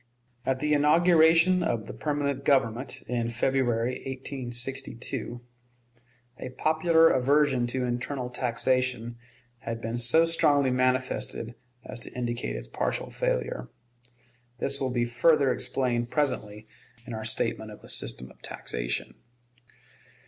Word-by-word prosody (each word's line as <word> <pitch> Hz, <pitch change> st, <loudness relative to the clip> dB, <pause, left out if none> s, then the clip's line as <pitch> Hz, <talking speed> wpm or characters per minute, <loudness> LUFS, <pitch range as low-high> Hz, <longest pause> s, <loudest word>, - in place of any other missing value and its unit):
At 130 Hz, -, +2 dB
the 150 Hz, 0 st, +2 dB
inauguration 165 Hz, +3 st, +5 dB
of 115 Hz, -10 st, -1 dB
the -, -, -7 dB
permanent 145 Hz, -2 st, -2 dB
Government, 130 Hz, -2 st, +1 dB
in 120 Hz, -1 st, -1 dB
February, 120 Hz, 0 st, 0 dB
1862, 130 Hz, -2 st, -4 dB, 1.0 s
a 130 Hz, -, -5 dB
popular 160 Hz, +1 st, +4 dB
aversion 135 Hz, -1 st, +3 dB
to 125 Hz, +1 st, -1 dB
internal 125 Hz, +1 st, -3 dB
taxation 125 Hz, -1 st, 0 dB, 0.4 s
had 115 Hz, -1 st, -5 dB
been 115 Hz, +1 st, -3 dB
so 120 Hz, +8 st, +4 dB
strongly 145 Hz, -5 st, +3 dB
manifested 130 Hz, -2 st, 0 dB, 0.3 s
as -, -, -7 dB
to -, -, -8 dB
indicate 120 Hz, -, -3 dB
its -, -, -6 dB
partial -, -, -2 dB
failure. 60 Hz, -, -2 dB, 0.9 s
This 140 Hz, +2 st, +1 dB
will 130 Hz, -, 0 dB
be 120 Hz, -1 st, +1 dB
further 135 Hz, +3 st, +3 dB
explained 120 Hz, -2 st, 0 dB
presently 110 Hz, -8 st, -1 dB, 0.4 s
in 120 Hz, -, -7 dB
our 110 Hz, 0 st, -4 dB
statement 115 Hz, 0 st, -1 dB
of 105 Hz, -, -11 dB
the -, -, -14 dB
system 65 Hz, 0 st, -2 dB
of -, -, -21 dB
taxation. -, -, -4 dB
125 Hz, 120 wpm, -27 LUFS, 120-145 Hz, 1.0 s, inauguration